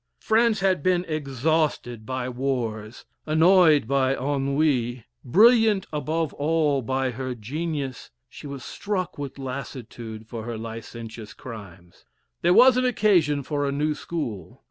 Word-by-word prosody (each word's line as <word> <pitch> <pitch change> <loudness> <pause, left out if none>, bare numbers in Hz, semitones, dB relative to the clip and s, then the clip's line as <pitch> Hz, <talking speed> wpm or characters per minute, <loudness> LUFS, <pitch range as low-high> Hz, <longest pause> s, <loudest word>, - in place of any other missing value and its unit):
France 220 -1 +2
had 190 -5 +2
been 180 +2 +1
exhausted 145 -5 -1
by 130 -1 -3
wars, 120 -4 -3 0.2
annoyed 160 - +5
by 135 0 +2
ennui, 135 -3 0 0.2
brilliant 220 - +5
above 155 +1 -1
all 150 -2 +1
by 130 +1 -1
her 130 +1 -4
genius, 140 +2 -4 0.2
she - - -11
was 140 -2 -7
struck 185 -6 -3
with 140 -1 -6
lassitude 120 -4 -7
for 115 0 -7
her 115 0 -5
licentious 115 -1 -8
crimes. 95 -7 -11 0.4
There 175 - +3
was 250 +6 +7
an 255 - +2
occasion 175 - +2
for 145 +1 -2
a - - 0
new 150 +2 0
school. 145 - -6
140 Hz, 130 wpm, -25 LUFS, 120-165 Hz, 0.4 s, was